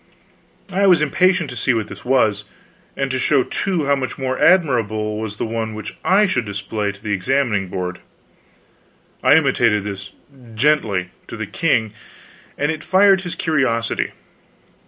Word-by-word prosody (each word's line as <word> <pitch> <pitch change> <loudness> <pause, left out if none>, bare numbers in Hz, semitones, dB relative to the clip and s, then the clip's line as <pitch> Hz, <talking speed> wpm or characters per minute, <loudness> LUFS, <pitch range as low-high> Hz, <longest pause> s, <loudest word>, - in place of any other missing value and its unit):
I 195 +2 +2
was 175 -5 +5
impatient 175 0 +2
to - - -7
see 120 +1 +1
what 110 -2 -2
this - - -11
was; 110 -6 +2 0.5
and 135 -1 -1
to 130 - -1
show, 135 0 +2
too, 180 -1 -2
how 140 0 +3
much 130 -2 -4
more 130 -1 -2
admirable 110 - +2
was 110 -2 -5
the - - -3
one 110 -1 -3
which 110 -1 -7
I 200 +3 +4
should 130 -11 0
display 100 +1 -3
to 100 - -17
the 105 - -3
Examining 105 0 0
Board. 90 0 -4 1.2
I - - +5
intimated 120 -9 +2
this, 100 -1 -6 0.5
gently, 110 -9 +1 0.2
to - - -8
the - - -4
king, 110 -2 0 0.6
and 145 +2 0
it 155 -1 -6
fired 195 0 +4
his 175 -2 -6
curiosity. 130 -8 0
125 Hz, 155 wpm, -20 LUFS, 105-150 Hz, 1.2 s, was